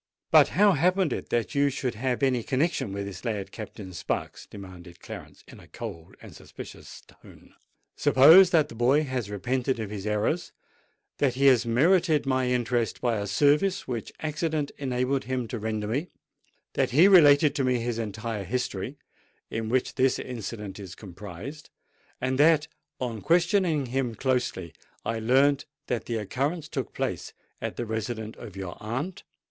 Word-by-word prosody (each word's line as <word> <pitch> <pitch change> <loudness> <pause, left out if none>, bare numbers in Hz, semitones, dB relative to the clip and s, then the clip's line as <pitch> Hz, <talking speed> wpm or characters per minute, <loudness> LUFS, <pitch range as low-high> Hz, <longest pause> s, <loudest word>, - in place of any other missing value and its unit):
"But - - +7
how 205 0 +6
happened 180 -1 +2
it - - -5
that 120 +3 -1
you 140 0 +3
should 130 -2 -3
have 125 +3 -2
any 130 -3 +2
connexion 135 - 0
with 100 0 -4
this 95 -3 -8
lad, 100 -4 -3
Captain 105 -3 -8
Sparks!" 85 - -4
demanded 90 -3 -11
Clarence, - - -10
in - - -13
a - - -16
cold 80 0 -8
and - - -12
suspicions - - -11
tone. - - -18 0.4
"Suppose 165 +8 +7
that 155 -4 +3
the - - -9
boy 125 +6 +3
has 130 -7 -3
repented 125 +4 -1
of 105 -2 -4
his 105 -1 -5
errors—that 125 +3 -3
he 140 +2 +1
has 125 -4 +5
merited 160 +5 +3
my 130 -1 +1
interest 120 -2 0
by 120 -3 0
a 100 0 -3
service 150 - +2
which 120 -3 -4
accident 155 -1 -2
enabled 130 0 -1
him 125 -1 -2
to 120 - -4
render 110 0 -2
me—that 140 +11 -5
he 160 +9 +6
related 150 -6 +7
to 145 -2 -1
me 130 -1 +2
his 115 0 -2
entire 110 -1 -4
history, 125 +3 -3 0.5
in 110 0 -3
which 130 +1 0
this 130 -1 +2
incident 105 -4 -6
is 95 -3 -8
comprised—and 110 - -8
that, 155 0 +5 0.3
on 115 -4 -4
questioning 170 - +2
him 125 -2 -2
closely, 120 - -1 0.3
I 115 0 -1
learnt 135 +5 +3 0.2
that 120 -5 -2
the 115 - -2
occurrence 140 - -2
took - - -4
place - - -4 0.3
at - - -4
the 120 - -3
residence 110 0 -4
of 105 -5 -10
your 95 -3 -6
aunt?" 130 - -4
125 Hz, 160 wpm, -27 LUFS, 110-145 Hz, 0.5 s, But